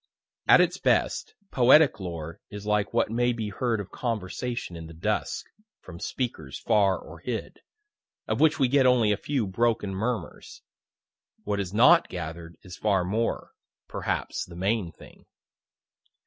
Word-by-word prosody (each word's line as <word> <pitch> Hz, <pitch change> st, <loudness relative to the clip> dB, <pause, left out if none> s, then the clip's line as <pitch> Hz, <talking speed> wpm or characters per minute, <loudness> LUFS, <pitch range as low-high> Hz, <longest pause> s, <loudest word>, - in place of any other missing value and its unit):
At -, -, +8 dB
its -, -, +1 dB
best, -, -, +1 dB, 0.2 s
poetic 130 Hz, +3 st, +5 dB
lore 85 Hz, -3 st, -6 dB
is 105 Hz, 0 st, -8 dB
like 105 Hz, -1 st, +1 dB
what -, -, +1 dB
may 120 Hz, +1 st, +2 dB
be 110 Hz, -3 st, -4 dB
heard 115 Hz, +2 st, -1 dB
of 95 Hz, -2 st, -7 dB
conversation 115 Hz, -2 st, -4 dB
in 80 Hz, -1 st, -8 dB
the 80 Hz, -, -12 dB
dusk, 80 Hz, -, -2 dB, 0.3 s
from 85 Hz, -2 st, -11 dB
speakers 80 Hz, -, -4 dB
far 100 Hz, -4 st, +2 dB
or -, -, -12 dB
hid, -, -, -5 dB, 0.7 s
of -, -, -1 dB
which 155 Hz, -2 st, +4 dB
we 135 Hz, -4 st, +3 dB
get 135 Hz, 0 st, +4 dB
only 120 Hz, -4 st, +4 dB
a -, -, +3 dB
few 130 Hz, +2 st, -2 dB
broken 105 Hz, 0 st, 0 dB
murmurs. 110 Hz, 0 st, -4 dB, 0.8 s
What 100 Hz, -1 st, -2 dB
is 95 Hz, -3 st, -3 dB
not 130 Hz, -, +5 dB
gather'd 85 Hz, -1 st, -7 dB
is 90 Hz, -2 st, -10 dB
far 100 Hz, -4 st, +1 dB
more 110 Hz, +6 st, -2 dB, 0.4 s
perhaps -, -, -3 dB
the 85 Hz, -, -12 dB
main 95 Hz, 0 st, -1 dB
thing. -, -, -17 dB
105 Hz, 150 wpm, -26 LUFS, 90-120 Hz, 0.8 s, At